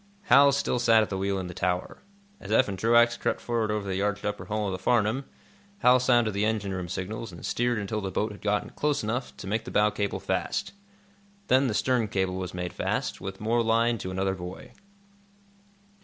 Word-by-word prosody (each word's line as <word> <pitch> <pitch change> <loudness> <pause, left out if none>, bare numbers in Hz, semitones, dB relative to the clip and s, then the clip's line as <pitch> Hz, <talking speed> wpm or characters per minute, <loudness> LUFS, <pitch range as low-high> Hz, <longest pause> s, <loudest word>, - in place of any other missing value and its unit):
Hal 140 -7 +6
still 140 -2 0
sat 115 -2 +5
at 105 - -6
the 95 - -1
wheel 100 0 0
in 95 - -3
the 90 - -7
tower. 90 0 -2 0.4
As - - -9
Eph 130 - +4
and 95 -2 -5
Truax 120 +2 +4
crept - - -1
forward 115 -2 -1
over 105 -1 -2
the 95 0 -1
arched 105 0 -1
upper 105 0 -3
hull 105 0 -2
of 100 - -1
the 95 - -4
"Farnum," 120 +5 +1 0.6
Hal 125 +1 +6
sounded 120 -3 +3
the 100 +1 0
engine 105 -3 -1
room 90 -2 -4
signals 100 +4 -5
and 85 - -9
steered 120 0 0
until 105 +1 -3
the 95 - -3
boat 105 +3 -1
had 105 - -11
gotten 105 0 -1
close 150 -4 -1
enough 120 +4 -3
to - - -8
make 110 +3 -1
the 125 - -8
bow 105 0 +3
cable 100 -1 -2
fast. - - -2 0.8
Then 130 +1 +4
the 110 - -1
stern 125 -2 +1
cable 95 -2 -1
was 90 -1 -4
made 90 -1 -4
fast, - - -2
with 95 0 -6
more 115 +2 +1
line, 115 0 +2
to 95 - -5
another 95 +1 -1
buoy. 90 0 -8
105 Hz, 215 wpm, -27 LUFS, 95-120 Hz, 0.8 s, Hal